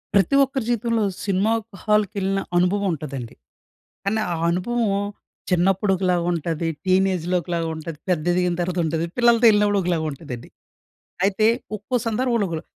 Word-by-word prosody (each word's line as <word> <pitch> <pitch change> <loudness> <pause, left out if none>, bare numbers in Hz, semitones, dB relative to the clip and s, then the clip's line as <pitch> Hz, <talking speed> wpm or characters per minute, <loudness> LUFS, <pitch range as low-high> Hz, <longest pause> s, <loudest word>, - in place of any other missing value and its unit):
ప్రతి 200 +8 +4
ఒక్కరి 270 -2 -2
జీవితంలో, 230 -1 +1 0.2
సినిమా 200 +2 +1 0.3
హాల్‌కెళ్ళిన 200 -2 +1 0.2
అనుభవం 195 +3 +2
ఉంటదండి. 135 -6 -6 0.7
కానీ, 210 +3 +1
ఆ - - 0 0.2
అనుభవం 230 +7 0 0.6
చిన్నప్పుడు 190 +3 +2
ఒకలాగా 180 -2 +1
ఉంటది, 165 0 -2 0.2
టీనేజ్‌లో 185 -2 +2
ఒకలాగా 170 0 -2
ఉంటది, 160 -1 -7
పెద్ద 170 -4 +1
ఎదిగిన 180 0 +1
తర్వాత 175 +1 -2
ఉంటది, 160 +1 -1
పిల్లలతో 235 -1 +4
వెళ్ళినప్పుడు 210 -1 +4
ఒకలాగా 170 -3 0
ఉంటదండి. 135 -4 -8 0.8
అయితే, 200 +2 +2 0.3
ఒక్కో 230 +5 -3
సందర్భంలో 230 -1 +1
ఒక్కోల. 165 -2 -4
190 Hz, 130 wpm, -22 LUFS, 170-210 Hz, 0.8 s, ప్రతి